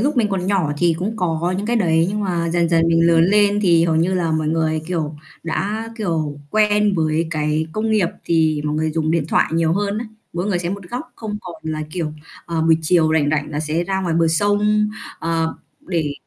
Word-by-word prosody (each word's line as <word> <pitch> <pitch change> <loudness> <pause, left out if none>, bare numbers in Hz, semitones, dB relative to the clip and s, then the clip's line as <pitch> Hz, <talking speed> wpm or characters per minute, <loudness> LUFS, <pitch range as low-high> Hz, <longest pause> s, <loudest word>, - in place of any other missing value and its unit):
lúc 285 +4 0
mình 225 -4 +3
còn 190 -2 -2
nhỏ 190 -7 +1
thì 170 -2 +3
cũng 210 +5 -3
có 175 -1 -1
những 200 - -3
cái 240 +1 +1
đấy 165 -5 +3
nhưng 210 +2 -2
mà 175 -4 -1
dần 170 0 +1
dần 165 0 +3
mình 165 0 +4
lớn 165 -1 +5
lên 205 +2 +3
thì 170 -4 +4
hầu 165 -2 +1
như 175 +4 +2
là 170 -3 0
mọi 155 -1 0
người, 160 0 0
kiểu, 160 -4 -3 0.3
đã, 205 +7 -2
kiểu, 160 -8 -2
quen 210 -1 +3
với 160 0 +1
cái 155 0 0
công 220 +3 -1
nghiệp 210 -6 +2 0.2
thì 160 -3 +2
mọi 150 0 -1
người 155 0 0
dùng 155 0 -1
điện 165 -2 +1
thoại - - +3
nhiều 165 0 +2
hơn 200 +2 -1
á, 235 - -4 0.3
mỗi 175 +3 -2
người 195 -4 0
sẽ 175 -1 -3
một 200 0 -5
góc 245 0 -6
không 210 -2 -5
còn 180 -3 -10
là, 155 -1 -3
kiểu, 160 -3 -3 0.3
ờ, 165 -1 -1
buổi 160 0 +4
chiều 160 -1 +3
rảnh 145 -2 +2
rảnh 150 -1 -1
là 150 0 -2
sẽ 155 +2 -1
ra 190 +1 -1
ngoài 175 -3 -1
bờ 165 0 +3
sông, 205 +5 +2 0.3
ờ, 165 -1 -1 0.3
để 165 -5 -2
170 Hz, 230 wpm, -20 LUFS, 160-200 Hz, 0.3 s, lớn